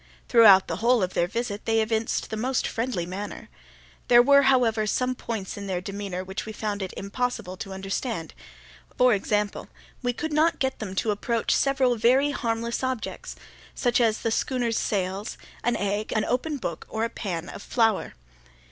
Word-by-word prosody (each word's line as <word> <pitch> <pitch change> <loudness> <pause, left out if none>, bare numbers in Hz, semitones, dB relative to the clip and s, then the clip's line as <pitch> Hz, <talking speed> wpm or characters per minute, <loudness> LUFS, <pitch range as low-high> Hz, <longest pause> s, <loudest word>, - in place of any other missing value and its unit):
Throughout 210 -6 +7
the 165 - -3
whole 235 0 +3
of 185 - -2
their 175 - +1
visit 225 0 -4
they 225 0 +2
evinced 220 0 -1
the - - -1
most 255 +4 0
friendly 225 -7 -2
manner. 195 +4 -6 0.6
There 240 0 +7
were, 280 +2 +6
however, 240 -5 +3
some 255 +4 0
points 220 -6 -5
in 200 -1 -6
their 185 -2 -1
demeanour 195 -1 -5
which 190 +1 -5
we 220 - -5
found 210 -1 -3
it 190 - -4
impossible 200 -2 -3
to 195 0 -7
understand; 195 -1 -4 0.6
for 250 -1 +5
example, 210 0 -1 0.3
we 245 -1 0
could 305 +5 -4
not 315 +2 +3
get 265 -1 -1
them 195 -3 -5
to 215 +2 +1
approach 230 +3 0
several 265 -3 +2
very 260 +6 +4
harmless 235 -3 -2
objects—such 255 0 -3
as 220 -2 +2
the 230 - 0
schooner's 240 -1 0
sails, 195 +1 -2 0.3
an 240 0 +1
egg, 205 +2 -2
an 215 - +1
open 285 +5 -1
book, 170 - -5
or 220 - -2
a - - +2
pan 180 -7 -4
of - - -8
flour. 225 -2 +1
225 Hz, 175 wpm, -26 LUFS, 200-245 Hz, 0.6 s, Throughout